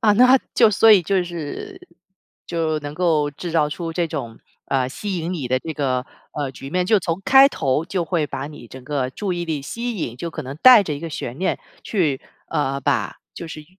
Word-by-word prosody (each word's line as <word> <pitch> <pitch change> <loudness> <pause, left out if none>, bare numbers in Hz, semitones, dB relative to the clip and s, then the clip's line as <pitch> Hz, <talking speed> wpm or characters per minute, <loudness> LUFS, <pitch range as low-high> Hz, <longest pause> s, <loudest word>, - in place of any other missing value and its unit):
啊， 215 -4 +4
那 250 +4 +6 0.2
就 225 -3 +6
所 220 +3 +5
以 195 -4 +7
就 190 +2 +1
是 175 - -7 0.7
就 160 -2 -1
能 145 0 -6
够 155 -4 +1
制 170 +4 -7
造 150 -3 +3
出 165 +2 -5
这 170 0 0
种， 115 -7 -6 0.3
呃， 130 -2 0
吸 195 +8 -4
引 170 +2 -3
你 150 -8 -3
的 130 +1 +1
这 160 - -5
个， 130 -4 -1 0.3
呃， 145 -3 -3
局 135 +1 -10
面， 180 +2 +1
就 215 +2 +4
从 175 -1 -3
开 270 +1 +7
头 145 - 0
就 180 -1 -2
会 165 -4 0
把 135 0 -5
你 150 -5 -11
整 130 +2 -11
个 135 -3 -2
注 195 +7 -3
意 175 -1 -3
力 155 -4 -3
吸 235 +7 -4
引， 120 -9 -4
就 170 +6 -4
可 155 - -6
能 135 +2 -7
带 255 -4 +9
着 170 - -4
一 - - -6
个 165 - -5
悬 130 -4 -6
念 190 - 0 0.3
去 155 -10 0 0.3
呃， 140 -3 -1
把 - - -1
就 170 - -8
是 155 -1 -9
165 Hz, 235 characters per minute, -21 LUFS, 140-185 Hz, 0.7 s, 带